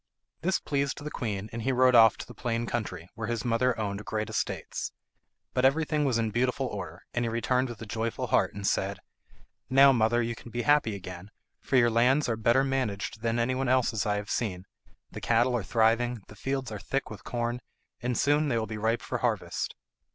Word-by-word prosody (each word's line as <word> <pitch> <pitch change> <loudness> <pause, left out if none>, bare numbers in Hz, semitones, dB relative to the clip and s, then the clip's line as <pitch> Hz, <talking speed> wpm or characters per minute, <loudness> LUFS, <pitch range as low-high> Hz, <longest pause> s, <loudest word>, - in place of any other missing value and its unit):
This 185 +4 +1
pleased 140 -1 -1
the 150 - -5
queen, 105 -3 -3
and 115 - -4
he 130 +4 0
rode 130 0 +4
off 115 -2 +7
to - - -7
the - - -11
plain 120 -1 -2
country, 95 -8 -4
where 115 -1 -5
his 120 +1 -2
mother 120 +1 +2
owned 100 -1 -3
great 110 0 -3
estates; - - -3 0.6
but 125 - +1
everything 150 +2 +2
was 130 -4 +2
in 110 -1 0
beautiful 125 +4 0
order, 90 -8 -6
and 120 - 0
he 115 - 0
returned 125 +3 0
with 120 -2 -8
a - - -6
joyful 110 +2 -2
heart, - - +1
and 100 -1 -5
said, 100 +1 0 0.7
"Now, 135 +1 +7
mother, 120 -1 +3
you 120 0 0
can 115 - -11
be 120 +1 -3
happy 145 -8 +3
again, 90 0 -8 0.3
for 135 - -2
your 120 -2 +5
lands 125 +6 +3
are 115 - 0
better 115 +4 +3
managed 115 -6 -2
than 115 0 0
anyone 130 +2 0
else's 125 -5 +2
I 105 - +2
have 105 0 -4
seen. 95 -6 -2 0.5
The - - -7
cattle 120 +2 +3
are 120 - 0
thriving; 115 +2 +1
the 105 - -12
fields 135 +2 -3
are 105 - -5
thick 135 +9 -3
with 105 - -9
corn, 120 0 -2 0.4
and 120 0 -1
soon 145 +1 +3
they 120 -5 +1
will 110 - 0
be 110 -1 -6
ripe 115 +2 0
for - - -3
harvest." - - -1
115 Hz, 210 wpm, -28 LUFS, 110-130 Hz, 0.7 s, off